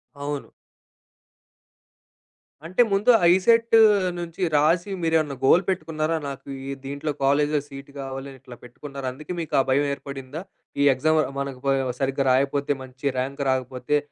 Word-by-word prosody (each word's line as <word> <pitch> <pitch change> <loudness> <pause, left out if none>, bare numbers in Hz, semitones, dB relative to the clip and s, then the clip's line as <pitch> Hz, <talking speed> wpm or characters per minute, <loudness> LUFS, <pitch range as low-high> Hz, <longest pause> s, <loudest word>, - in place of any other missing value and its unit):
అవును. 145 0 -5 2.2
అంటే 185 +8 +2
ముందు 200 +5 +2
ఆ - - +3
ఈసెట్ 230 +4 +3 0.4
నుంచి 170 +2 -7
రాసి 170 +6 +2
మీరేమన్నా 160 -4 +1
గోల్ 175 +7 +5
పెట్టుకున్నారా? 160 -3 -1
నాకు 135 0 -9 0.2
ఈ - - -2
దీంట్లో 140 +2 -3
కాలేజ్‌లో 145 +2 +2
సీట్ 140 0 -11
కావాలి 135 0 -6
ఇట్లా 125 -1 -12
పెట్టుకున్నారా 135 +2 -8
అందుకే 155 +6 -7
మీకు 160 - -7
ఆ - - +6
భయం 140 +2 +3
ఏర్పడిందా? 140 +3 -7 0.4
ఈ - - +4
ఎగ్జామ్ 155 +4 +2 0.2
మనకు 135 -2 -5 0.4
సరిగ్గా 135 0 0
రాయకపోతే 140 +2 +1
మంచి 130 +2 -12
ర్యాంక్ 140 +2 -3
రాకపోతే 130 +2 -1
145 Hz, 130 wpm, -24 LUFS, 135-160 Hz, 2.2 s, ఆ